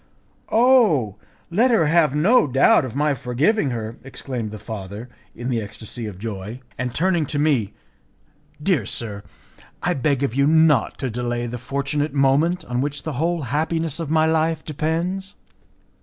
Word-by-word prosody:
"Oh! 220 - +4 0.3
let 230 +9 +3
her 225 -9 +3
have 150 -2 +3
no 190 +6 +4
doubt 135 0 +4
of 130 - -7
my 150 +1 +2
forgiving 140 - +1
her," 115 -1 -5
exclaimed 130 -4 -5
the 110 - -7
father, 105 +2 -7 0.3
in 120 +1 -6
the 115 -2 0
ecstacy 110 +2 -7
of 100 -4 -8
joy, 105 +2 -6 0.2
and 125 0 -3
turning 170 0 +1
to 145 - -2
me, 140 -9 +1 0.8
"Dear 150 - +1
sir, 105 -4 -3 0.6
I - - +2
beg 140 0 0
of 135 - -1
you 140 +2 +2
not 160 -5 +3
to 130 -3 -3
delay 120 +1 -2
the 120 +1 -5
fortunate 140 +3 -2
moment 145 +6 +2
on 125 0 -2
which 145 0 -3
the 155 - -4
whole 170 -1 0
happiness 160 +4 -1
of 165 -3 -4
my 160 0 +3
life 160 0 +1
depends." 170 +6 -2
140 Hz, 160 wpm, -22 LUFS, 120-160 Hz, 0.8 s, Oh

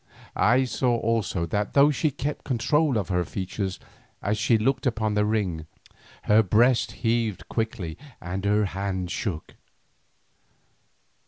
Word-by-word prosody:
I 125 +4 +4
saw 125 -1 0
also 110 -7 0
that 105 +5 -2
though 140 +1 +6
she 155 +2 +1
kept 145 +2 -4
control 140 +2 +1
of 100 -4 -2
her 90 -1 +1
features 95 +1 -4 0.4
as 105 +1 0
she 115 0 +3
looked 130 +4 0
upon 110 -3 0
the 105 0 +2
ring, 95 -7 -1 0.6
her 105 +1 +5
breast 115 +5 +3
heaved 115 -3 0
quickly 110 -8 -3 0.2
and 95 +3 -5
her 105 +1 +2
hand 95 -2 -3
shook. 85 -8 -4
110 Hz, 135 wpm, -25 LUFS, 95-120 Hz, 0.6 s, though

